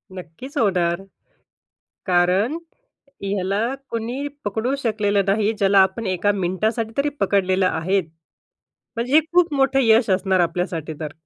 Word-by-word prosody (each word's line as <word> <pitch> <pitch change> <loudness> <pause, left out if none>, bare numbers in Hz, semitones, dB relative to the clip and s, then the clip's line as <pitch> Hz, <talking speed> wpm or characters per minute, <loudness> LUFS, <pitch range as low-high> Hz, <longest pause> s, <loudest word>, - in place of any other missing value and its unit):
नक्कीच 185 - -9
होणार. 180 -6 +1 1.1
कारण 185 - +2 0.7
ह्याला 195 0 -1 0.3
कुणी 235 +5 -3 0.2
पकडू 220 +6 -1
शकलेलं 210 -5 0
नाही, 210 +2 +2
ज्याला 195 0 +4
आपण 220 +4 -1
एका 190 +2 +1
मिनिटासाठी 215 +4 -1
तरी 280 +1 +1
पकडलेलं 190 -1 +2
आहेत. 185 +3 0 0.9
म्हणजे 235 +3 -3
हे 310 - +8
खूप 350 -3 +3
मोठं 270 0 +2
यश 225 -1 +4
असणार 190 0 +2
आपल्यासाठी 170 -2 -2
तर. 150 -2 -5
200 Hz, 125 wpm, -21 LUFS, 185-230 Hz, 1.1 s, हे